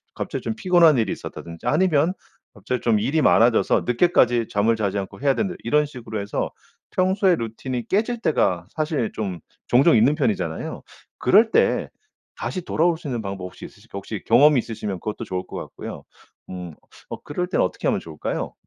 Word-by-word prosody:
갑자기 - - -4
좀 225 - -3
피곤한 175 -8 +5
일이 110 -4 +1
있었다든지 85 -1 -7
아니면 160 0 +3 0.4
갑자기 115 +4 -4
좀 115 -3 +2
일이 150 +9 +1
많아져서 115 -3 +4
늦게까지 120 -4 +3
잠을 110 +3 +2
자지 100 -2 -1
않고 100 +5 -6
해야 140 -1 +3
된다 195 -4 -1
이런 150 +5 +2
식으로 120 -6 -7
해서 100 0 -2 0.4
평소에 190 0 +2
루틴이 115 0 -5
깨질 225 +4 0
때가 90 - +1
사실 155 -7 -2
좀 95 -5 -4 0.3
종종 135 +6 +5
있는 130 +7 +4
편이잖아요. 85 - -2 0.4
그럴 220 +3 +4
때 - - +2 0.5
다시 185 - -3
돌아올 170 0 +1
수 160 - -9
있는 120 -4 -2
방법 95 -2 -5
혹시 90 - -9
있으실까요? 100 -1 -10
혹시 100 +1 -7
경험이 135 +4 +6
있으시면 105 -5 -4
그것도 105 +3 -5
좋을 90 0 -3
것 - - -7
같고요. - - -8 0.5
음 90 -3 -7 0.4
어 - - -7
그럴 180 +5 -3
땐 - - +1
어떻게 - - -1
하면 - - +1
좋을까요? 80 -2 -4
120 Hz, 390 characters per minute, -23 LUFS, 105-160 Hz, 0.5 s, 경험이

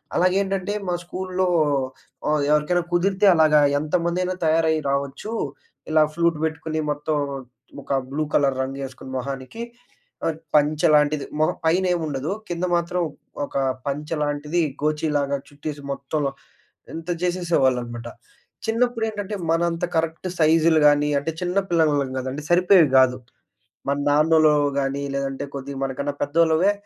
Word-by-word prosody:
అలాగేంటంటే 195 +2 +1
మా 180 - 0
స్కూలులో 185 +1 -2 0.8
ఆహ్, 150 -1 +2
ఎవరికైనా 150 +4 +2
కుదిరితే 190 +3 +2
అలాగా 155 -2 +5 0.2
ఎంతమందైనా 175 +4 -1
తయారయి 160 0 +3
రావచ్చు. 140 +9 -3 0.6
ఇలా 155 -1 +5
ఫ్లూట్ 170 -1 +2
పెట్టుకొని 160 0 -3
మొత్తం 150 +1 -1 0.7
ఒక - - -3 0.2
బ్లూ 155 +2 -1
కలర్ 135 -2 +2
రంగేసుకొని 135 -1 -7
మొహానికి 135 - -5 0.6
అ - - +3 0.3
పంచెలాంటిది 150 0 +3
మొహ 155 - +3
పైనేం 180 +1 +2
ఉండదు. 145 +4 -3 0.2
కింద 175 +1 -1
మాత్రం 170 +1 -1 0.4
ఒక - - -16 0.3
పంచెలాంటిది 150 +2 -1 0.2
గోచీలాగా 150 -2 0
చుట్టేసి 145 0 -7
మొత్తంలో 140 +1 -2 0.6
ఇంత 165 +1 -7
జేసేసేవాళ్ళనమాట. 130 -10 0 0.6
చిన్నప్పుడేంటంటే 225 -3 -1
మన 165 +1 +2
అంత 170 +1 -2
కరెక్ట్ 165 +2 -1
సైజులు 160 0 +4
గానీ 145 0 +3
అంటే 155 +4 -3
చిన్న 180 +1 -1
పిల్లలం 150 -5 +2
గదండి. 130 +3 -5
సరిపోయేవి 180 -2 +5
గాదు. 130 -1 +5 0.7
మన 140 - +1
నాన్నోల్లవో 150 -1 +4
గానీ 135 +1 -1
లేదంటే 135 -1 -3
కొద్దిగ 140 +1 -6
మనకన్నా 140 +2 -2
పెద్దోళ్ళవే 165 +5 +3
155 Hz, 115 wpm, -23 LUFS, 140-175 Hz, 0.8 s, అలాగా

